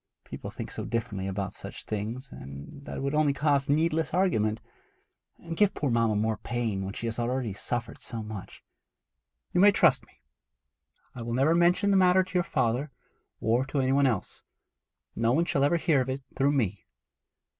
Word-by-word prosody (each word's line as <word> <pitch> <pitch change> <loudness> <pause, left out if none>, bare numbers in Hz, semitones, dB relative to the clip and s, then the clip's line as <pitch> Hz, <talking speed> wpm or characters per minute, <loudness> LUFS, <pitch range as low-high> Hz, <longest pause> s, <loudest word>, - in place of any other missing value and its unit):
People - - -7
think - - -7
so - - -5
differently 110 -5 -3
about 95 0 -3
such - - -7
things 110 +5 -4
that 70 - -9
it - - -4
would 140 +1 -1
only 150 -2 +3
cause 140 -1 +1
needless 160 +2 +1
argument, 110 - +2 0.8
and 165 -1 -7
give 205 +2 +3
poor 140 -4 -1
mamma 115 -2 +2
more 110 +1 0
pain 115 -5 -2
when 95 +1 -5
she - - -5
has 115 0 -2
already 120 -2 -1
suffered 115 +3 -4
so 115 -3 -3
much.' 105 -2 -8 0.9
'You 180 - +3
may 205 +1 +8
trust - - +3
me. 65 - -28 0.9
I 125 - -8
will 115 0 -3
never 140 +5 +4
mention 175 +4 +3
the 195 - +4
matter 185 0 +5
to 185 - -13
your 180 - +3
father, 125 -2 0 0.5
or 115 +3 +2
to 140 - -1
any 130 0 +2
one 140 0 +4
else. 115 -7 -2 0.7
No 115 +1 +2
one 165 +5 +2
shall 140 -4 +1
ever 145 +4 +3
hear 155 -4 +2
of 130 - -3
it 130 +1 -3
through 140 +1 +2
me.' 105 -9 -1
130 Hz, 185 wpm, -28 LUFS, 110-155 Hz, 0.9 s, may